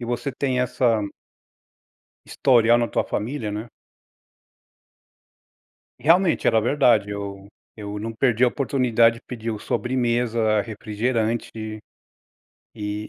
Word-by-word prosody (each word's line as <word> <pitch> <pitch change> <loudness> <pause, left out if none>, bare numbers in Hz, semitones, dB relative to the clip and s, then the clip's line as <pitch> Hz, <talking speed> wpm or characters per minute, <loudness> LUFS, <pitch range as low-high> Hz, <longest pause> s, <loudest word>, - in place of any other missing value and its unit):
E - - -5
você 120 +3 -3
tem 130 -1 -1
essa" 120 -2 +1 1.3
historia 120 -3 +4
na 120 -1 +1
tua - - 0
família, 110 0 -3
né. 105 +3 -5 2.3
E - - -20
realmente 170 +2 +3
era 110 - +4
verdade. 120 -4 +3
Eu 100 -1 -6 0.3
eu 105 0 -6
não 115 +2 -5
perdia 120 +1 +2
a - - +2
oportunidade 120 -4 +2
de 115 - -13
pedir 115 -2 -4
o 105 - -5
sobremesa, 120 -4 0
refrigerante. 110 +2 -2 1.3
Eh 105 0 -4
115 Hz, 115 wpm, -23 LUFS, 110-125 Hz, 2.3 s, historia